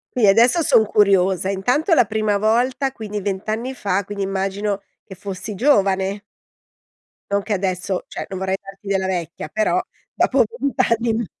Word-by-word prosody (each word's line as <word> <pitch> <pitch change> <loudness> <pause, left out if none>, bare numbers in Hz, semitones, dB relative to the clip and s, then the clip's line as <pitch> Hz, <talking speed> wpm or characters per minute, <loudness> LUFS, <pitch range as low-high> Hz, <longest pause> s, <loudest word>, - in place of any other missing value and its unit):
Sì, 235 -5 +4
adesso 235 - +5
son 225 -8 +4
curiosa. 195 -3 +3
Intanto 250 - +1
la 245 - +5
prima 215 0 0
volta, 245 +6 +1
quindi 210 -4 -5
20 195 +1 -4
anni 235 +5 -2
fa, 200 -5 -1
quindi 200 0 -4
immagino 195 +1 -2 0.2
che 190 - -11
fossi 195 +2 -6
giovane. 200 -5 +2 1.1
Non 200 0 +2
che 210 - -3
adesso 185 -1 -2
cioè, - - -6
non 190 - -5
vorrei 190 0 -1
darti 195 +1 -13
della 195 -1 0
vecchia, 170 -4 -4
però 215 +5 +1 0.3
dopo - - +3
20 280 - -4
anni. 230 0 +1
200 Hz, 160 wpm, -21 LUFS, 190-225 Hz, 1.1 s, adesso